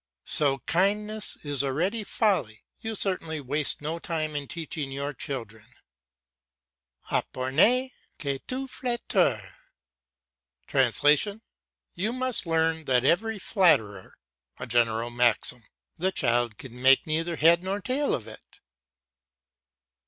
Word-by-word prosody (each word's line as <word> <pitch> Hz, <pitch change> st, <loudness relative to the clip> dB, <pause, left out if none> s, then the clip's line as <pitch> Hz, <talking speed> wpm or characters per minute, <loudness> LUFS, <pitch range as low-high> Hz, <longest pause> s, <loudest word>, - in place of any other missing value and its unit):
So 140 Hz, -3 st, +4 dB
kindness 210 Hz, +4 st, 0 dB
is 145 Hz, -2 st, 0 dB
already 175 Hz, -, -1 dB
folly. 190 Hz, -, -1 dB, 0.2 s
You 225 Hz, 0 st, -5 dB
certainly 175 Hz, -6 st, 0 dB
waste 145 Hz, +2 st, -1 dB
no 160 Hz, +3 st, -3 dB
time 155 Hz, -3 st, -3 dB
in 145 Hz, -1 st, -4 dB
teaching 155 Hz, -3 st, -5 dB
your 140 Hz, +2 st, -4 dB
children. 115 Hz, -, -7 dB, 1.4 s
"Apprenez 205 Hz, -, +2 dB, 0.3 s
que 140 Hz, -2 st, -3 dB
tout 265 Hz, +1 st, -3 dB
flatteur" 245 Hz, -2 st, 0 dB, 2.5 s
("You 210 Hz, +7 st, -1 dB
must 255 Hz, -6 st, -1 dB
learn 160 Hz, -1 st, 0 dB
that 125 Hz, -1 st, +2 dB
every 220 Hz, +9 st, +2 dB
flatterer"). 110 Hz, -, +1 dB, 0.4 s
A -, -, -6 dB
general 115 Hz, 0 st, 0 dB
maxim. 120 Hz, -1 st, +1 dB, 0.3 s
The 185 Hz, +3 st, 0 dB
child 120 Hz, -, 0 dB
can 125 Hz, -1 st, -11 dB
make 135 Hz, +1 st, +5 dB
neither 165 Hz, +2 st, -2 dB
head 165 Hz, +3 st, +4 dB
nor 195 Hz, +2 st, -2 dB
tail 260 Hz, +7 st, -1 dB
of 115 Hz, -3 st, -8 dB
it. 110 Hz, -, -15 dB
155 Hz, 110 wpm, -26 LUFS, 130-195 Hz, 2.5 s, make